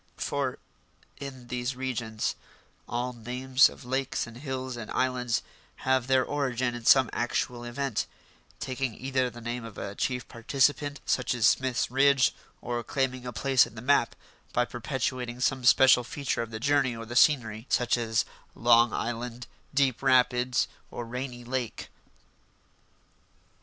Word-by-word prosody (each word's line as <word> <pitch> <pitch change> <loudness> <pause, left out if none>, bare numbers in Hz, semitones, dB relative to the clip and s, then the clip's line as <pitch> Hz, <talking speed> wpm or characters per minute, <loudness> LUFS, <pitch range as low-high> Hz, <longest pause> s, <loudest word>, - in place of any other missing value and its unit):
For, 140 -3 -2 0.6
in 130 -3 -8
these 125 +1 -2
regions, 120 -4 -2 0.6
all 125 +2 -2
names 125 +3 +3
of - - -13
lakes 130 +1 -1
and 115 +1 -11
hills 130 -2 -4
and 115 -3 -7
islands 125 -2 0 0.4
have 130 -1 +2
their 130 -1 +3
origin 130 -4 -1
in 120 -1 -7
some 130 0 +7
actual 120 0 -1
event, 125 0 -2 0.5
taking 130 -3 -3
either 130 -1 0
the 120 0 -11
name 120 +1 -4
of 115 -3 -9
a 100 - -5
chief 125 +2 -2
participant, 145 +4 0
such - - +1
as 115 - +2
Smith's 130 -2 +2
Ridge, 135 0 +4 0.3
or 120 -1 -2
claiming 130 -1 -2
a - - -3
place 135 +2 +3
in - - -15
the 110 - -7
map 140 +2 +3 0.4
by 125 - +2
perpetuating 125 0 -3
some 130 +1 +1
special 130 0 +6
feature 135 -1 -2
of 115 - -4
the 110 -1 -6
journey 140 -1 +2
or 115 0 -7
the 120 +2 -7
scenery, 120 -5 +3
such 125 -1 +2
as 115 -2 0 0.3
Long 120 0 +5
Island, 120 +1 -4 0.3
Deep 135 -3 +2
Rapids, 125 0 +3 0.2
or 120 - -6
Rainy 125 +1 -5
Lake. 125 -1 -4
125 Hz, 145 wpm, -28 LUFS, 120-130 Hz, 0.6 s, some